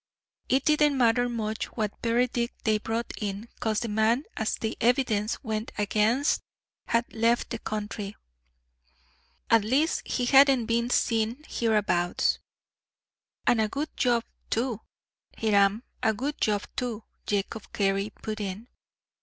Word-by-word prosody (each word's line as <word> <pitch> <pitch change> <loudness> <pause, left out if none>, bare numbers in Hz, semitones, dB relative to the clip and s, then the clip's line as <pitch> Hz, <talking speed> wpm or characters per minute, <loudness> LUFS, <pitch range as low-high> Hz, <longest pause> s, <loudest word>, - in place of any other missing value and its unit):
It 265 +2 +2
didn't 300 -2 +4
matter 245 0 +3
much 220 -2 -2
what 215 -3 -2
verdict 240 +1 0
they 215 -1 +2
brought 225 +2 -3
in, 205 +2 -3
'cause 220 -2 0
the 235 - -2
man 220 +5 +2
as 220 - -1
the 220 0 -3
evidence 230 -3 +2
went 220 -2 -3
against 215 +6 +2 0.5
had 230 +1 0
left 230 +1 +1
the 230 - -3
country 210 -1 -4 1.4
at 225 -2 +6
least, 275 +9 +2
he 250 - 0
hadn't 270 -2 +6
been 235 +1 0
seen 230 +3 +1
hereabouts." 210 -6 +1 1.1
"And 225 - +4
a 215 - +1
good 290 +6 -4
job 240 -2 +2 0.3
too, 230 -2 -1 0.6
Hiram 205 0 +3 0.2
a 220 -1 +2
good 280 +7 -3
job 210 -1 +2
too," 230 -3 -3 0.2
Jacob 205 +2 -2
Carey 195 0 +1
put 215 0 -6
in. 205 +4 -5
225 Hz, 130 wpm, -27 LUFS, 215-245 Hz, 1.4 s, at